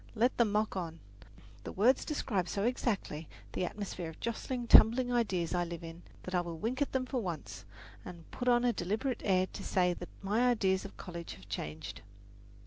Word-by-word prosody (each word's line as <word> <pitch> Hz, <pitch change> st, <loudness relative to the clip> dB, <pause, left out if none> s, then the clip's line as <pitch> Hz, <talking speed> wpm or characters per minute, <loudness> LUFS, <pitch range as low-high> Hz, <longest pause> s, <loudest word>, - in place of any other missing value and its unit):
Let 240 Hz, +3 st, +3 dB
them 230 Hz, -4 st, +3 dB
mock 210 Hz, 0 st, +1 dB
on. 165 Hz, -3 st, -4 dB, 0.6 s
The -, -, -5 dB
words 245 Hz, +7 st, +3 dB
describe 205 Hz, -, -1 dB
so 200 Hz, -, -1 dB
exactly 205 Hz, -, -1 dB, 0.2 s
the 180 Hz, -, 0 dB
atmosphere 185 Hz, -3 st, -5 dB
of 160 Hz, -, -12 dB
jostling, 240 Hz, +1 st, -3 dB
tumbling 245 Hz, +2 st, +7 dB
ideas 190 Hz, -9 st, +1 dB
I 175 Hz, -1 st, +2 dB
live 170 Hz, -1 st, -6 dB
in 165 Hz, +1 st, -8 dB, 0.2 s
that 185 Hz, -, -6 dB
I 180 Hz, -, +3 dB
will 170 Hz, -1 st, -6 dB
wink 240 Hz, -, -2 dB
at 285 Hz, -, +1 dB
them 260 Hz, -1 st, 0 dB
for 255 Hz, -1 st, -2 dB
once, 110 Hz, -, -5 dB, 0.4 s
and 170 Hz, +3 st, -9 dB
put 250 Hz, -, -4 dB
on 240 Hz, 0 st, +5 dB
a 240 Hz, -, +3 dB
deliberate 220 Hz, +7 st, -1 dB
air 185 Hz, -2 st, +3 dB
to -, -, -6 dB
say 180 Hz, -1 st, +2 dB
that 175 Hz, 0 st, -8 dB
my 225 Hz, +6 st, +3 dB
ideas 190 Hz, -5 st, +2 dB
of 200 Hz, -, -10 dB
college 170 Hz, -2 st, -7 dB
have 95 Hz, +1 st, -15 dB
changed. 80 Hz, -5 st, -5 dB
195 Hz, 195 wpm, -33 LUFS, 170-240 Hz, 0.6 s, tumbling